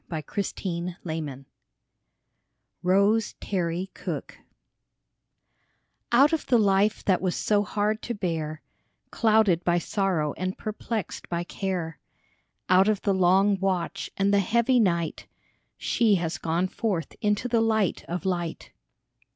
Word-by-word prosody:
36 170 - -4 0.2
ROSE 200 -2 -1
TERRY 175 -1 -4
COOKE 150 -5 -5 1.4
ROSE 200 +4 +3
TERRY 180 -1 -2
COOKE - - -6 1.7
OUT 275 +6 +5
of 320 - -1
the 245 - +4
life 205 0 +2
that 190 -2 +2
was 185 -2 0
so 205 -1 +2
hard 210 +2 -1
to 240 - -4
bear, 160 -5 -3 0.5
Clouded 215 -6 +3
by 175 0 +2
sorrow 175 -5 0
and 185 +1 -3
perplexed 215 -1 -5
by 170 0 -1
care, 175 -4 -4 0.7
Out 185 +2 +5
of 215 -2 +1
the 200 - +2
long 190 +2 +3
watch 185 -3 -1
and 200 +1 +2
the 200 - +5
heavy 235 +5 +2
night, 170 -6 0 0.5
She 220 -4 +2
has 165 -4 -2
gone 170 +3 0
forth 185 -6 -3
into 210 +3 +1
the 230 -2 +2
light 220 -4 +1
of 175 +1 -4
light. 175 -3 -3
190 Hz, 130 wpm, -26 LUFS, 175-210 Hz, 1.7 s, OUT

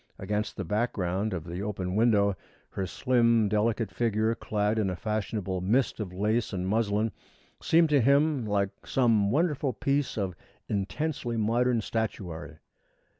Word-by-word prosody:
Against 105 +2 -3
the 100 - -3
background 105 0 -1
of 90 -4 -3
the 85 +3 -6
open 95 -3 -3
window, 105 -3 +3 0.4
her 95 -1 -3
slim, 115 -2 +2
delicate 110 +1 0
figure, 110 -1 +1
clad 105 -1 -1
in 100 -3 +1
a 90 - -2
fashionable 105 -3 -2
mist 115 +9 +1
of 100 -4 -4
lace 105 +5 0
and 90 -1 -2
muslin, 105 +1 +1 0.5
seemed 165 0 +4
to 145 -3 +4
him 140 +2 +3
like 100 -1 +1 0.2
some 115 -6 +3
wonderful 145 - +1
piece 140 +2 -1
of 95 -4 -2 0.3
intensely 120 +4 -2
modern 115 +2 +2
statuary. 95 -8 -4
110 Hz, 140 wpm, -28 LUFS, 100-120 Hz, 0.5 s, seemed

